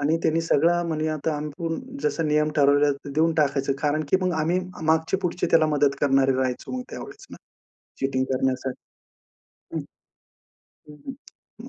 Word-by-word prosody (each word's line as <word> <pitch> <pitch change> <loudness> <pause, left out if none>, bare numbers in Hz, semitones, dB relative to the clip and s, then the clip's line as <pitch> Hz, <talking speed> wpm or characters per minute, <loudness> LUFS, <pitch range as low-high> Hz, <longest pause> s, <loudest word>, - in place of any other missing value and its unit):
आणि 150 +3 +2
त्यांनी 160 +1 +2
सगळं 165 +2 +2
म्हणी 155 -1 -1
आता 155 0 -2
आपण 150 +2 -4 0.2
जसं 165 -2 0
नियम 150 0 +2
ठरवले 145 0 +4 0.2
देऊन 160 +3 +2
टाकायचं 140 -2 +1
कारण, 150 +1 +1
की - - +5
मग 185 -1 +1
आम्ही 170 +4 +1 0.3
मागची-पुढची 170 +3 +1
त्याला 160 -1 +5
मदत 145 -2 +2
करणारे 135 -1 +3
राहायचे 130 -1 -2
ना, - - -3
मग 255 - -3
त्यावेळेस 405 +1 -9
ना - - -9 0.6
चीटिंग 135 -1 0
करण्यासाठी. 130 0 -1 0.9
हं, - - -1 1.1
हं, 150 - -12 0.7
हं. - - -10
150 Hz, 150 wpm, -24 LUFS, 140-165 Hz, 1.1 s, की